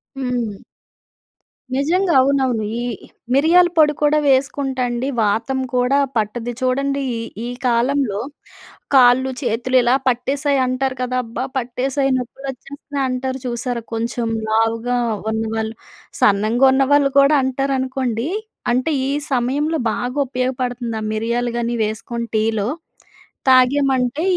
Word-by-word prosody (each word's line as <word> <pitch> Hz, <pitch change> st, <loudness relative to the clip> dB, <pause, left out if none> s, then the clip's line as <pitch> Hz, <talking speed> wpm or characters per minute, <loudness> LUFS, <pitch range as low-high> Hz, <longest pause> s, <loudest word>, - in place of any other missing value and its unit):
హ్మ్. 245 Hz, -6 st, -2 dB, 1.2 s
నిజంగా 340 Hz, +6 st, +1 dB
అవునవును. 260 Hz, -4 st, +2 dB, 0.2 s
ఈ -, -, -2 dB, 0.5 s
మిరియాల 345 Hz, +5 st, +5 dB
పొడి 300 Hz, -1 st, +5 dB
కూడా 300 Hz, 0 st, +3 dB
వేసుకుంటండి 265 Hz, -2 st, 0 dB, 0.2 s
వాతం 225 Hz, +6 st, 0 dB
కూడా 250 Hz, +2 st, +2 dB, 0.2 s
పట్టది 225 Hz, +3 st, -2 dB
చూడండి. 275 Hz, +2 st, 0 dB
ఈ -, -, -3 dB, 0.3 s
ఈ -, -, -4 dB, 0.2 s
కాలంలో 240 Hz, -2 st, +1 dB, 0.8 s
కాళ్ళు, 260 Hz, +1 st, +5 dB
చేతులు 250 Hz, +1 st, -1 dB
ఇలా 240 Hz, +2 st, +3 dB
పట్టేసాయి 275 Hz, +3 st, +1 dB
అంటారు 255 Hz, +1 st, -1 dB
కదా 255 Hz, 0 st, -1 dB
"అబ్బా! 235 Hz, +2 st, -5 dB
పట్టేసాయి 265 Hz, +2 st, -1 dB
నొప్పులు 255 Hz, +2 st, -6 dB
వచ్చేస్తున్నాయి" 275 Hz, +1 st, -5 dB
అంటారు 260 Hz, +1 st, -3 dB
చూసారా! 240 Hz, 0 st, -2 dB
కొంచెం 230 Hz, +1 st, -2 dB, 0.2 s
లావుగా 225 Hz, +2 st, +1 dB, 0.3 s
ఉన్నవాళ్ళు, 220 Hz, 0 st, -2 dB, 0.5 s
సన్నంగా 215 Hz, +5 st, +3 dB
ఉన్నవాళ్ళు 275 Hz, +1 st, +3 dB
కూడా 280 Hz, +2 st, +5 dB
అంటారనుకోండి. 260 Hz, -1 st, -1 dB, 0.4 s
అంటే 255 Hz, +6 st, 0 dB, 0.2 s
ఈ -, -, -1 dB, 0.2 s
సమయంలో 285 Hz, +6 st, 0 dB
బాగా 250 Hz, +5 st, -3 dB
ఉపయోగపడుతుంది. 250 Hz, -2 st, -2 dB
ఆ -, -, -4 dB
మిరియాలు 235 Hz, +2 st, -1 dB
గాని 235 Hz, 0 st, -1 dB
వేసుకొని 235 Hz, +2 st, -4 dB
టీలో 220 Hz, -1 st, 0 dB, 0.8 s
తాగమంటే 260 Hz, +1 st, +3 dB
255 Hz, 110 wpm, -19 LUFS, 235-275 Hz, 1.2 s, మిరియాల